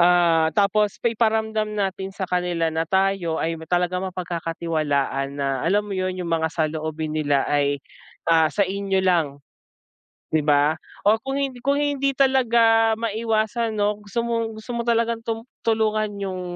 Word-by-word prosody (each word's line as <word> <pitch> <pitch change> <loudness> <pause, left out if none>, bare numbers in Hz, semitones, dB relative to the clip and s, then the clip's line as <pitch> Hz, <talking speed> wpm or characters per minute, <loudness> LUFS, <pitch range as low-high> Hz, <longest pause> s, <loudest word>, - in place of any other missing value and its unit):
Ah, 170 -2 +4
tapos 205 0 +2
iparamdam 220 -2 +1
natin 195 -1 -2
sa 195 - -2
kanila 175 -2 0
na 160 +1 -1
tayo 190 -3 +1
ay 165 +1 -1
talagang 180 +1 0
mapagkakatiwalaan 160 -6 -2
na 135 -2 -1
alam 205 +4 +2
mo 205 - -5
'yun 185 0 -1
'yung 180 -2 -4
mga 160 -1 +1
saloobin 155 -1 -2
nila 145 -3 +1
ay, 145 -1 +1 0.5
ah, 160 -1 +5
sa 200 - +2
inyo 195 0 -1
lang. 165 -6 +1 0.9
'Di 155 - +2
ba? 150 +1 +3 0.3
O 215 +2 +6
kung 270 +1 -2
hin 275 -1 -1
kung 280 +1 +3
hindi 280 -1 +1
talaga 235 -4 +4
maiwasan 225 0 -1
'no 205 0 +1
gusto 205 +4 -2
mong, 230 -2 -2
gusto 245 - -8
mo 235 - -1
talagang 230 0 +1
tum 225 0 -2 0.2
tulungan 215 -1 +1
'yung, 190 -2 -4
190 Hz, 150 wpm, -23 LUFS, 165-225 Hz, 0.9 s, O